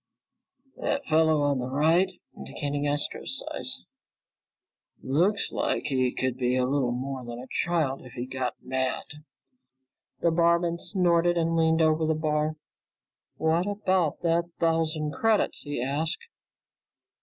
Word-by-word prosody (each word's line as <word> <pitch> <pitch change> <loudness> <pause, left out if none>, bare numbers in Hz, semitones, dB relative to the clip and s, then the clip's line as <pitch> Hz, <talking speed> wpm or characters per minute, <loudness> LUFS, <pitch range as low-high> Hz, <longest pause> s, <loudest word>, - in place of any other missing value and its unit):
"That 280 -1 -1
fellow 160 -1 +3
on 140 -2 +1
the 125 - -3
right," 165 +7 +3 0.2
indicating 145 -1 -3
Astro's 145 0 0
size, - - -2 1.2
"looks 175 +10 +2
like - - -1
he 130 -3 +1
could 130 -1 -2
be 125 -1 +1
a 130 -1 +2
little 130 -2 +1
more 130 +1 -4
than 120 0 -7
a 125 - -8
child, 160 -6 0
if 125 - -12
he 120 - -4
got 130 -2 -3
mad." 130 0 -1 1.2
The 170 - +3
barman 170 0 +2
snorted 175 -3 +2
and 165 0 +1
leaned 160 0 +3
over 155 0 +2
the 160 - +2
bar. 155 0 0 0.8
"What 165 +4 +1
about 190 -6 0
that 170 0 +2
thousand 160 -2 +1
credits?" 225 -2 +1
he 145 -4 -3
asked. 155 - -1
155 Hz, 130 wpm, -27 LUFS, 130-170 Hz, 1.2 s, fellow